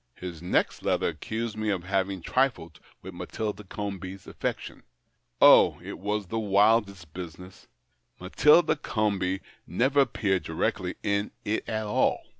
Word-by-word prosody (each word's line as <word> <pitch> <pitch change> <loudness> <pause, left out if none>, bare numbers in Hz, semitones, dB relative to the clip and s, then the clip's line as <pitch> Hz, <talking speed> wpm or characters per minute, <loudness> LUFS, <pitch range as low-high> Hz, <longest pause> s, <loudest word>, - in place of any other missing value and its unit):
His 85 -3 -8
next 90 - 0
letter - - +1
accused 110 0 -4
me 110 0 -2
of 95 -4 -1
having 95 0 -1
triHed 130 -10 0 0.2
with - - -8
Matilda 105 -1 -5
Comby's 95 -1 -6
aftections. - - -5 0.6
Oh, - - +7
it - - -7
was 105 +2 -2
the 115 +5 -3
wildest 100 -5 +2
business! 90 +1 -10 0.5
Matilda 150 - +4
Comby 100 -7 -1 0.3
never 130 - +1
appeared 100 -8 +1
directly - - -2
in 100 0 0 0.2
it 105 +2 -2
at 110 -1 -2
all. 105 - +1
100 Hz, 130 wpm, -27 LUFS, 95-110 Hz, 0.6 s, Oh